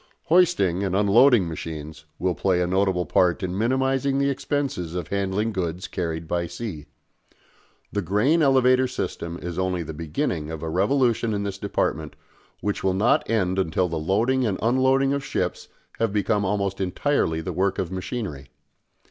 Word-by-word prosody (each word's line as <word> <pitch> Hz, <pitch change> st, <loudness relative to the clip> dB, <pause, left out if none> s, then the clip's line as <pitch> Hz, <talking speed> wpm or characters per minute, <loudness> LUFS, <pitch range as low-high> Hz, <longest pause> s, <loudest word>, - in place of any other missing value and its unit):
Hoisting 155 Hz, -, +3 dB
and 95 Hz, -1 st, -1 dB
unloading 105 Hz, +1 st, +5 dB
machines 80 Hz, -1 st, -7 dB
will 90 Hz, -1 st, 0 dB
play 90 Hz, 0 st, +1 dB
a 90 Hz, -, +2 dB
notable 95 Hz, -1 st, +1 dB
part 90 Hz, +2 st, +2 dB
in 90 Hz, 0 st, -2 dB
minimising 135 Hz, +4 st, +1 dB
the 140 Hz, 0 st, +2 dB
expenses 130 Hz, -, -2 dB
of 90 Hz, -3 st, -4 dB
handling 100 Hz, +3 st, -1 dB
goods 90 Hz, -2 st, -3 dB
carried 80 Hz, -2 st, -4 dB
by 85 Hz, +1 st, -1 dB
sea. 85 Hz, -4 st, -6 dB, 1.0 s
The 105 Hz, -, -1 dB
grain 105 Hz, -, +2 dB
elevator 130 Hz, -2 st, +4 dB
system 85 Hz, -8 st, -4 dB
is 90 Hz, 0 st, -5 dB
only 90 Hz, -2 st, -1 dB
the 80 Hz, -, -7 dB
beginning 75 Hz, -1 st, -3 dB
of 80 Hz, -1 st, -6 dB
a 80 Hz, -, -3 dB
revolution 115 Hz, -, +1 dB
in 100 Hz, -, -2 dB
this 100 Hz, -1 st, -4 dB
department 80 Hz, -6 st, -2 dB, 0.5 s
which 105 Hz, 0 st, -2 dB
will 95 Hz, -1 st, +1 dB
not 105 Hz, +5 st, +2 dB
end 95 Hz, -4 st, +1 dB
until 90 Hz, 0 st, +1 dB
the 80 Hz, -2 st, -3 dB
loading 115 Hz, +11 st, +1 dB
and 105 Hz, -5 st, 0 dB
unloading 130 Hz, +3 st, +2 dB
of 140 Hz, -1 st, -2 dB
ships -, -, -3 dB, 0.3 s
have 115 Hz, -2 st, +1 dB
become 105 Hz, 0 st, +1 dB
almost 100 Hz, -1 st, -1 dB
entirely 95 Hz, -, 0 dB
the 80 Hz, -, -4 dB
work 95 Hz, +1 st, 0 dB
of 90 Hz, -2 st, -2 dB
machinery. 95 Hz, -, -5 dB
95 Hz, 165 wpm, -24 LUFS, 85-120 Hz, 1.0 s, unloading